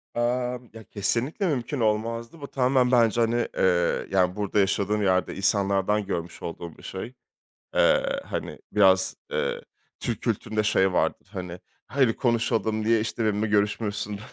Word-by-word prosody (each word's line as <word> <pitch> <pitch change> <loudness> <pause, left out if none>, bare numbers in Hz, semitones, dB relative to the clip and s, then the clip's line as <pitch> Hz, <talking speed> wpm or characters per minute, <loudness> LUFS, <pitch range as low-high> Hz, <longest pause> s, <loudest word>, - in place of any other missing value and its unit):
Emm, 125 0 -1
ya, 115 0 -10
kesinlikle 120 - -1
mümkün 140 -2 -2
olmazdı. 115 +5 -1
Bu 140 - -6
tamamen 130 -1 +2
bence, 120 -2 +4
hani, 115 +1 +1
eee, 90 -2 +2
yani, 90 -1 +2
burada 105 0 0
yaşadığım 100 +2 +1
yerde 95 -1 +1
insanlardan 100 +1 +1
görmüş 85 -3 -4
olduğum 85 -1 -7
bir - - -16
şey. 105 +7 -6 0.6
Eee, - - +3
hani, - - -5
biraz, 95 -2 +4 0.2
eee, - - -1 0.4
Türk - - -3
kültüründe 110 -1 -1
şey 95 -3 +2
vardır, - - 0
hani, 90 -3 -6 0.3
hadi 130 -4 +2
konuşalım 110 -3 0
diye, 115 0 +4
işte, 115 +1 -2
benimle 105 0 +1
görüşmüyorsun, 105 0 -1
110 Hz, 140 wpm, -26 LUFS, 95-120 Hz, 0.6 s, bence